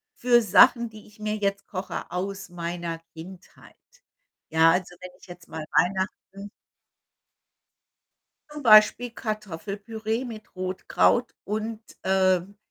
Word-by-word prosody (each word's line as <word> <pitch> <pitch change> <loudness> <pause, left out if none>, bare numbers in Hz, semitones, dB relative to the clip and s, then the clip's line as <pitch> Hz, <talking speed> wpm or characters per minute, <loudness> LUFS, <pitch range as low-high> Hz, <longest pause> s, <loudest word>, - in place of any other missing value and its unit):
für 240 -1 +4
Sachen, 235 +3 +5
die 215 -1 -14
ich 210 0 -21
mir 215 0 -2
jetzt 200 -1 -2
koche 185 -1 -5
aus 195 +2 -4
meiner 170 -1 -5
Kindheit. 175 +3 -13 0.7
Ja, 160 +1 +5
also 180 0 -1
wenn 185 0 -9
ich - - -17
jetzt 175 -1 -12
mal 160 -1 -7
Weihnachten 190 +2 -1 2.0
zum 295 -1 -9
Beispiel 220 +2 +6
Kartoffelpüree 215 +2 -4
mit 220 -5 -10
Rotkraut 185 +6 +1
und, 215 +2 -4 0.2
ähm, 190 +1 +1
195 Hz, 115 wpm, -25 LUFS, 180-215 Hz, 2.0 s, Beispiel